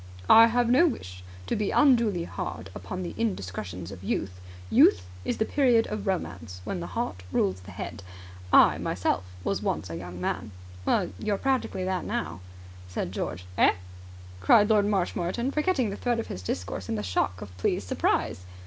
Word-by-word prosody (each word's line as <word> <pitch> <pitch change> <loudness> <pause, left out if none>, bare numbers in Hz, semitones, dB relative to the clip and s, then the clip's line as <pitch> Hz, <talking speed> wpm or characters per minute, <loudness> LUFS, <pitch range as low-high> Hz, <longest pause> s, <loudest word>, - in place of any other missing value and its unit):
"I 225 +1 +10
have 240 +1 +2
no 260 +9 +5
wish 90 - -5 0.2
to - - -1
be 210 -1 0
unduly 235 - +4
hard - - -6
upon 95 - -5
the 85 -2 -5
indiscretions 95 -3 -3
of 95 -1 -10
Youth. 90 -1 -3 0.3
Youth 90 +1 +5 0.2
is - - -2
the 220 - +1
period 245 -5 +3
of 210 -1 -4
Romance, 115 - -3
when 90 - -3
the 85 - -5
heart 90 0 -2
rules 95 0 +1
the 90 - -12
head. 100 +2 -6 0.5
I - - +6
myself - - 0 0.2
was - - -1
once 80 +3 -2
a - - -4
young 90 +1 -8
man." 105 +3 -3 0.3
"Well, - - +1
you're 205 - 0
practically 260 -7 0
that 185 -1 -1
now," 85 +3 -3 0.5
said 90 -1 -3
George. 90 -1 -4
"Eh?" - - +6 0.6
cried 205 - +5
Lord 205 -2 +4
Marshmoreton, 195 +4 0
forgetting 300 - +1
the 200 - -5
thread 240 -2 0
of 230 - -2
his 90 - -6
discourse 90 +1 -4
in - - 0
the 105 - -3
shock 90 -1 0
of 90 -1 -9
pleased - - 0
surprise. 90 0 0
105 Hz, 175 wpm, -27 LUFS, -, 0.6 s, I